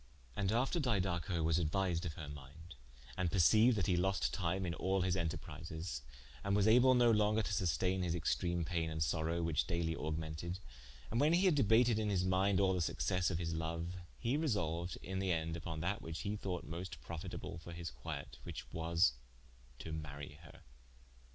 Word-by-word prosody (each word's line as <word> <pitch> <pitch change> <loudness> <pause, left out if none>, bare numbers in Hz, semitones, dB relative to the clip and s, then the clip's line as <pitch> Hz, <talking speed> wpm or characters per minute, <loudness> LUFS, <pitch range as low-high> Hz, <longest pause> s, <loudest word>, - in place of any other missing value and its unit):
And 100 -1 0
after 130 +9 +1
Didaco 90 - 0
was 80 +1 +3
aduertised 85 +1 0
of 80 - -3
her 75 - -7
minde, 75 +4 -10 0.4
and 90 +1 0
perceiued 110 +6 +5
that 100 -5 0
he 90 - +2
lost 90 -9 +1
time 95 +2 -1
in 85 - -2
all 95 +4 0
his 90 -1 +1
enterprises, 80 -3 -4 0.4
and 100 0 +1
was 105 0 +4
able 125 +3 +6
no 120 -1 +5
longer 105 0 +3
to - - -3
susteine 90 +2 +1
his 85 -2 0
extreme 85 0 0
paine 85 -1 -1
and 80 0 0
sorowe, 80 +2 0
whiche 80 -2 +1
daily 85 -1 0
augmented, 80 +3 -3 0.5
and 115 - +1
when 150 +3 +4
hee 180 +3 +4
had 185 - +6
debated 115 -3 +4
in 105 -1 0
his 95 -3 +2
minde 95 +1 +3
all 95 -1 +3
the 90 - 0
successe 90 +2 0
of 90 - -1
his 85 -1 -2
loue, 80 +1 -3 0.3
he 125 +4 0
resolued 85 - -1
in 95 +1 -3
the 95 -1 0
end 80 -1 -1
vpon 80 -1 -4
that 100 +7 -1
which 80 0 -5
he 100 +1 -2
thought 95 -4 -3
moste 85 -2 -6
profitable 85 +1 -6
for 85 +1 -10
his 85 -1 -5
quiet, - - -7
whiche - - -6
was 80 -4 +3 0.6
to 80 - -7
marye 75 -1 -7
her. 80 - -14
85 Hz, 190 wpm, -36 LUFS, 80-100 Hz, 0.6 s, able